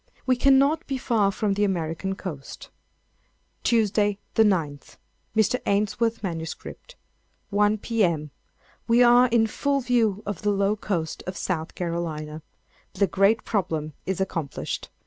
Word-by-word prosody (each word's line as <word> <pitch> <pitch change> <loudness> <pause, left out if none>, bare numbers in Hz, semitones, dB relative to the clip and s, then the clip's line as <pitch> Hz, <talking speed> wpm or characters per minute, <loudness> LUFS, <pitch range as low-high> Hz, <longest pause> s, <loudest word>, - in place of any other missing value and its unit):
We 255 - +3
cannot 275 +5 +3
be 270 - -2
far 220 -6 +1
from 205 0 0
the 205 +1 0
American 185 0 -1
coast. 155 -9 -8 0.9
"Tuesday, 210 -3 +2 0.2
the - - +3
9_th_. 165 -10 0 0.4
[Mr. 220 +3 +2
Ainsworth's 215 +3 0
MS.] 165 -4 -3 1.0
One, 210 +1 +3
P.M. 175 -10 0 0.6
We 235 +1 +5
are 245 +1 +6
in 230 -2 +3
full 280 +5 0
view 230 -5 +1
of 200 -4 -4
the 210 - +1
low 200 +1 +2
coast 175 -7 -3
of 185 - -4
South 165 -3 -3
Carolina. 160 -3 -4 0.5
The 200 - +3
great 195 +4 +2
problem 160 -7 -2
is 190 -1 -1
accomplished. 165 -7 -3
200 Hz, 130 wpm, -25 LUFS, 170-230 Hz, 1.0 s, are